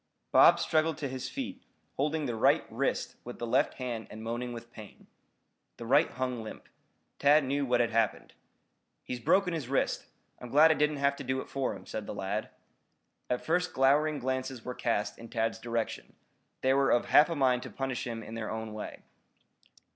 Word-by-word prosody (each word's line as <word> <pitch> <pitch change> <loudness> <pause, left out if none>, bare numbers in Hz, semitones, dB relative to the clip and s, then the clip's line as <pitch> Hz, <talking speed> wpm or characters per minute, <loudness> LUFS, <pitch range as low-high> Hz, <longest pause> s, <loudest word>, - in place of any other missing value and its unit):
Bob - - +7
struggled 155 -1 +1
to 145 - -3
his 130 -1 -5
feet, 265 -1 -5 0.3
holding 150 +2 0
the 120 - -2
right 110 - +4
wrist - - -1
with 120 - -8
the 120 - -4
left 115 - +2
hand 120 -4 -4
and 110 +1 -9
moaning 120 +2 -3
with 120 0 -9
pain. 110 -4 -12 0.7
The 115 - -7
right 140 +6 +4
hung 125 -1 -3
limp. 110 - -9 0.5
Tad 145 +2 +5
knew 140 +1 -1
what 125 -1 +3
had 115 -1 0
happened. 115 -1 0 0.7
"He's 125 - -5
broken 180 - +2
his 150 -7 -4
wrist. 135 - 0 0.3
I'm 125 - -8
glad 155 +5 +6
I - - +6
didn't 150 -1 +1
have 140 0 +2
to - - -6
do 130 0 -1
it - - -7
for 135 -2 -2
him," - - -12
said 110 -2 -5
the - - -5
lad. 100 +2 -3 0.8
At 125 - -1
first 180 +2 +1
glowering 145 +3 +3
glances 130 -2 -3
were 125 - -3
cast 105 -4 -1
in 115 - -10
Tad's 115 0 -1
direction. 115 -1 -3 0.5
They 130 0 +3
were 135 0 +3
of 120 - +3
half 150 +3 +6
a 165 - -2
mind 130 -3 +2
to - - -7
punish 135 -2 -3
him 115 -1 -5
in 110 - -9
their 115 -1 -4
own 110 0 -5
way. 110 - -7
130 Hz, 195 wpm, -30 LUFS, 115-145 Hz, 0.8 s, Bob